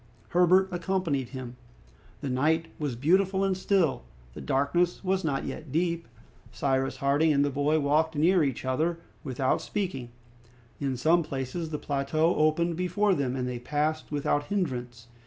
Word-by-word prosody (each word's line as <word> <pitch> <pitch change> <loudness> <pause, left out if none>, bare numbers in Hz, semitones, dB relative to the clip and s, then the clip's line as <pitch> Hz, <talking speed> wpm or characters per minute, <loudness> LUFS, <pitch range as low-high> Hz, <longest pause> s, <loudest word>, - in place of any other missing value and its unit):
Herbert 180 +2 +4
accompanied 175 -8 -1
him. 125 -2 -7 0.6
The 140 - -3
night 160 +5 +1
was 145 -5 -2
beautiful 190 +8 +2
and 195 -1 +1
still, 185 -6 +1 0.3
the - - -8
darkness 170 +8 +1
was 190 0 0
not 140 -4 -1
yet 155 -4 -7
deep. 170 +2 0 0.4
Cyrus 135 -1 0
Harding 145 +3 +2
and 140 -1 +3
the 145 - -1
boy 145 +3 +1
walked 155 +2 +1
near 170 +3 +4
each 135 -3 -2
other, 155 +6 0 0.3
without 130 -1 0
speaking. 175 - -3 0.7
In 135 -3 -2
some 165 +7 +3
places 145 +2 -4
the 150 - -3
plateau 150 +4 0
opened 165 +2 +2
before 180 +3 +1
them, 135 -6 -1
and 125 -1 -2
they 125 -1 -4
passed 150 +5 -2
without 145 0 0
hindrance. 125 - -3
155 Hz, 155 wpm, -28 LUFS, 135-175 Hz, 0.7 s, Herbert